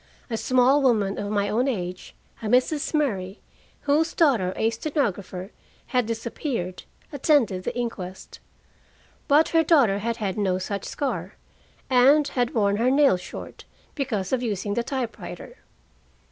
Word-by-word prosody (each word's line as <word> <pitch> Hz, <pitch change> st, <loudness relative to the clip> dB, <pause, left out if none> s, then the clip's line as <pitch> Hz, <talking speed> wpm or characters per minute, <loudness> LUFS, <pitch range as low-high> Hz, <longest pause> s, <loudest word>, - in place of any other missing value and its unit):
A -, -, 0 dB
small 255 Hz, +4 st, +3 dB
woman 215 Hz, -7 st, +2 dB
of 205 Hz, -, -3 dB
my 205 Hz, -1 st, 0 dB
own 240 Hz, +6 st, +1 dB
age, 180 Hz, -7 st, -4 dB, 0.3 s
a 220 Hz, -, -4 dB
Mrs. 255 Hz, +6 st, +2 dB
Murray, 205 Hz, -, -1 dB, 0.4 s
whose 305 Hz, +3 st, +1 dB
daughter, 240 Hz, -, +3 dB
a 225 Hz, -, +1 dB
stenographer, 205 Hz, -, -3 dB, 0.4 s
had 250 Hz, -3 st, +2 dB
disappeared, 225 Hz, -, -4 dB, 0.3 s
attended 255 Hz, -, +2 dB
the -, -, -3 dB
inquest. 190 Hz, -6 st, -5 dB, 0.9 s
But 305 Hz, +1 st, +4 dB
her 330 Hz, -, +4 dB
daughter 270 Hz, -, +4 dB
had 230 Hz, +2 st, -2 dB
had 205 Hz, -2 st, -3 dB
no 190 Hz, -3 st, +1 dB
such 195 Hz, +1 st, -4 dB
scar, 280 Hz, -, -3 dB, 0.5 s
and 275 Hz, +3 st, +5 dB
had 245 Hz, -3 st, -1 dB
worn 200 Hz, -2 st, +2 dB
her 240 Hz, +3 st, +2 dB
nails 270 Hz, -9 st, +4 dB
short, -, -, -9 dB, 0.3 s
because 235 Hz, -, -2 dB
of 255 Hz, -, +1 dB
using 205 Hz, -3 st, -2 dB
the 235 Hz, -, 0 dB
typewriter. 260 Hz, -, -6 dB
235 Hz, 140 wpm, -25 LUFS, 200-275 Hz, 0.9 s, and